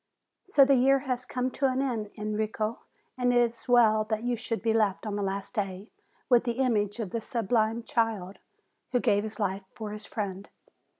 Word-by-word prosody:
So 295 -8 +5
the 275 - +4
year 270 +2 +5
has 250 -1 -2
come 255 +1 -2
to 270 +2 +1
an 260 0 0
end, 235 -6 -1
Enrico, 215 +1 -2 0.4
and 245 0 +3
it 245 - +3 0.2
is 235 - -20
well 225 -3 +5
that 215 +1 -2
you 245 0 0
should 230 -1 -4
be 225 -1 +2
left 215 -2 +1
on 210 -1 -2
the 205 - -2
last 195 +2 -3
day 195 -2 -4 0.4
with 245 -2 +5
the 240 -1 -1
image 230 -4 0
of 205 -5 -3
the 230 - -2
sublime 225 0 0
child, 220 -6 -1 0.5
who 245 - +4
gave 205 -3 +2
his 220 0 -7
life 195 -1 -1
for 215 -2 -6
his 210 +1 -8
friend. 200 -2 -4
220 Hz, 195 wpm, -28 LUFS, 210-245 Hz, 0.5 s, So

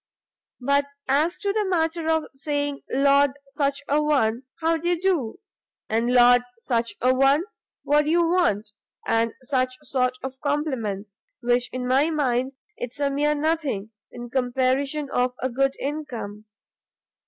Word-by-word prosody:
But 280 +2 +2 0.2
as 300 +6 +2
to 400 -1 0
the 430 0 +1
matter 325 -2 0
of 320 -1 +2
saying 285 0 -2
Lord 280 0 +4 0.2
such 280 0 -1
a 295 +2 +2
one, 265 -5 +1
how 330 0 +2
d'ye 345 +2 0
do? 340 -8 -1 0.5
and 230 +2 +1
Lord 245 0 +6 0.2
such 230 -1 -1
a 255 +2 +4
one, 275 +4 +4 0.4
what 295 +1 +3
do - - -1
you 340 +1 +3
want? 220 - +1 0.3
and 230 0 +1
such 255 0 0
sort 255 -1 0
of 265 0 -6
compliments, 230 -9 -2 0.2
why 245 +1 +2
in 255 0 -4
my 270 +5 +3
mind, 265 -4 0 0.2
it's 245 +3 -6
a 285 -1 +1
mere 295 +2 +1
nothing, 290 -9 -1 0.2
in 240 -1 -9
comparison 265 +3 0
of 250 0 +1
a 260 - -1
good 270 +2 +1
income. 245 -8 -5
275 Hz, 145 wpm, -24 LUFS, 245-300 Hz, 0.5 s, Lord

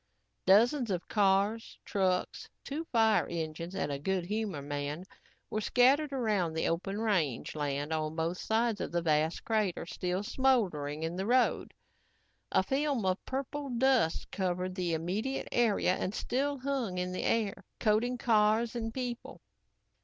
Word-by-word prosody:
Dozens 235 +6 +5
of 180 -3 -2
cars, 205 +2 +1
trucks, 185 -3 -1
two 305 +4 -4
fire 225 -6 +3
engines 165 +2 -4
and 145 - -1
a 140 - -3
Good 185 +3 -1
Humor 205 -7 -3
man 145 +3 -4 0.5
were 215 - -1
scattered 270 +7 +4
around 210 -10 0
the 160 - 0
open 195 +5 -2
range 185 - 0
land 145 +1 -2
on 155 0 -2
both 165 +2 -1
sides 225 -1 0
of - - -3
the 170 0 0
vast 155 0 +1
crater 215 -5 0
still 180 +3 -2
smoldering 185 - +1
in 165 +2 -3
the 190 +2 -2
road. 250 +1 +2 0.8
A - - +3
film 275 -5 0
of 185 0 0
purple 275 +2 -4
dust 245 -8 +2
covered 185 -1 -1
the 180 -3 -1
immediate 200 +11 -2
area 225 -6 +2
and 190 +2 -3
still 280 +3 -1
hung 260 -8 -2
in 180 0 -2
the 185 - -3
air, 215 -4 0 0.2
coating 230 +3 +2
cars 225 0 +2
and 225 -1 -3
people. 245 0 -5
200 Hz, 150 wpm, -31 LUFS, 170-240 Hz, 0.8 s, Dozens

